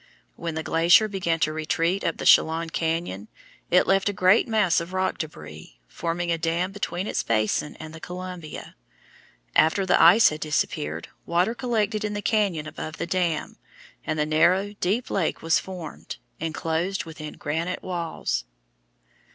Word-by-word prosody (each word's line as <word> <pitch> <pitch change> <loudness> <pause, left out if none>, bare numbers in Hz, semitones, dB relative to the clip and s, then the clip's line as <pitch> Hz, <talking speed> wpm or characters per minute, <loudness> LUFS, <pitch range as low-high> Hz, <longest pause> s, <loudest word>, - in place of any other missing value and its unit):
When 165 -2 -5
the 160 - -3
glacier 170 +7 +5
began 180 -5 -1
to 155 - +2
retreat 165 +4 0
up 165 - -1
the - - -5
Chelan 165 +1 +4
cañon, 160 - -2 0.4
it - - +5
left 195 +1 +2
a - - -2
great 185 +3 +4
mass 215 -6 +3
of 170 +2 -8
rock 185 0 -1
débris, 75 - -8
forming 170 - -3
a 165 - 0
dam 170 +3 0
between 195 -2 -3
its - - -1
basin 110 +6 0
and 155 0 -8
the 160 - -9
Columbia. 180 -2 -8 0.8
After 160 +5 +4
the 185 - +4
ice 190 +7 +8
had 150 - -6
disappeared, 80 - -2 0.2
water 175 +6 +2
collected 220 -4 -1
in 210 -1 -2
the 205 - -3
cañon 200 -9 +1
above 155 0 -7
the - - -2
dam, 170 -3 -1 0.5
and 155 - -2
the 150 - +1
narrow, 180 +6 +3
deep 210 +7 -1
lake 180 -5 -1
was 165 -1 +3
formed, 180 -5 -8 0.2
enclosed 165 +4 -2
within 155 -2 -8
granite 165 +5 -3
walls. 170 - -3
170 Hz, 160 wpm, -25 LUFS, 155-190 Hz, 0.8 s, ice